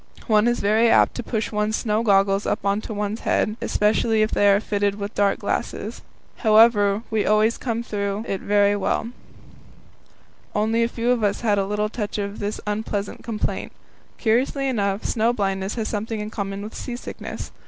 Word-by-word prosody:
One 215 -1 +3
is 240 0 +1
very 220 +3 +3
apt - - +4
to - - -4
push 220 -2 -3
one's 210 0 0
snow 215 -2 0
goggles 195 -2 +3
up - - -1
on 200 +1 +1
to 225 - -8
one's 210 +2 -3
forehead, 215 - +1
especially 215 +1 +2
if 215 - -1
they 205 - +4
are 200 0 +5
fitted 205 -1 0
with 205 0 -5
dark 200 -1 +2
glasses. - - -3 0.4
However, 215 -2 +4
we 220 -1 +1
always 215 +2 +2
came 235 -2 -2
through 200 -1 -3
it 195 - -3
very 205 0 +3
well; 205 +3 -1 1.5
only 220 +2 +1
a 230 - +3
few 235 +1 -1
of 240 -3 +1
us 205 -1 0
had 210 -4 +2
a 195 - -1
little 210 +1 0
touch 215 -2 -4
of 200 0 -4
this 205 +1 -3
unpleasant 210 -1 -3
complaint. 225 -2 -3 0.4
Curiously 260 +4 +1
enough, 200 -5 -1
snow 230 +1 +1
blindness 195 -2 -2
has 225 -2 -2
something 220 +1 -3
in 210 +1 -5
common 200 -1 -4
with 215 - -8
seasickness. 245 -1 -7
210 Hz, 180 wpm, -23 LUFS, 200-225 Hz, 1.5 s, are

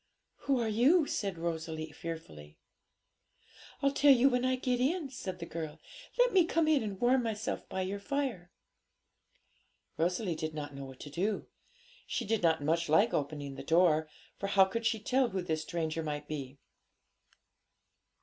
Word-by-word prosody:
'Who 270 -2 +3
are 230 - 0
you?' 265 +10 +4
said 195 -9 -2
Rosalie 160 -1 -4
fearfully. 80 - -8 1.3
'I'll 275 - +4
tell 285 +1 +5
you 265 +1 +6
when 250 -1 0
I 255 0 +2
get 250 -1 -1
in,' 290 +2 0
said 190 -8 -5
the 170 - -6
girl. 160 -3 -6 0.4
'Let - - +4
me 375 -2 +6
come 330 -1 +1
and 215 -11 +1
warm 250 +2 +4
myself 220 -2 -3
by 190 - -2
your 195 +2 -3
fire!' 240 -7 -2 1.5
Rosalie 180 +3 0
did 155 -1 -4
not 145 -1 -5
know 140 0 -7
what 130 -1 -11
to 145 - -8
do. 195 +7 -1 0.6
She 240 - -2
did 225 +1 0
not 160 -3 +2
much 165 +2 +1
like 200 +9 +4
opening 145 -1 -2
the 135 0 -8
door, 160 -1 +3 0.3
for 200 - -2
how 195 -1 +6
could 230 +4 -1
she 225 -1 0
tell 255 +3 +2
who 190 -3 -3
this 160 -3 -1
stranger 165 -1 -2
might 150 -1 -4
be? 140 -3 -6
185 Hz, 165 wpm, -32 LUFS, 155-245 Hz, 1.5 s, you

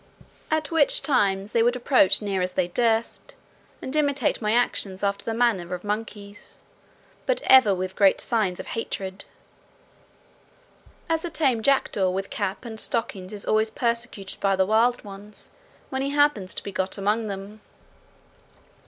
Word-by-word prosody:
At 315 -1 -1
which 320 -3 +3
times 200 -7 +1
they 230 - +2
would 240 +2 +3
approach 250 -6 +3
as - - -5
near 195 -2 -1
as 180 0 -2
they 180 -1 0
durst, 230 +3 -1 0.5
and 260 - -4
imitate 285 -6 +1
my 210 -1 0
actions 205 -5 0
after 200 0 0
the 225 - -3
manner 200 -7 +1
of 180 - -10
monkeys, 205 -1 -6 0.7
but - - 0
ever 260 -7 +6
with 185 +1 -4
great 195 -2 +4
signs 210 -7 0
of - - -6
hatred; 195 -4 -5 1.8
as 325 -1 0
a 345 - -3
tame 275 -8 +1
jackdaw 220 -7 +2
with 195 +2 -3
cap 200 +3 -3
and 220 -2 -7
stockings 195 -6 -2
is 205 -1 -6
always 215 0 +2
persecuted 235 -4 -3
by 195 -1 +2
the 190 0 +2
wild 230 +4 +2
ones, 205 +1 -10 0.4
when 265 0 -2
he 275 - -1
happens 290 -10 +1
to - - -5
be 200 - -6
got 190 +1 -3
among 210 +3 0
them. 200 +2 -7
215 Hz, 160 wpm, -25 LUFS, 195-245 Hz, 1.8 s, ever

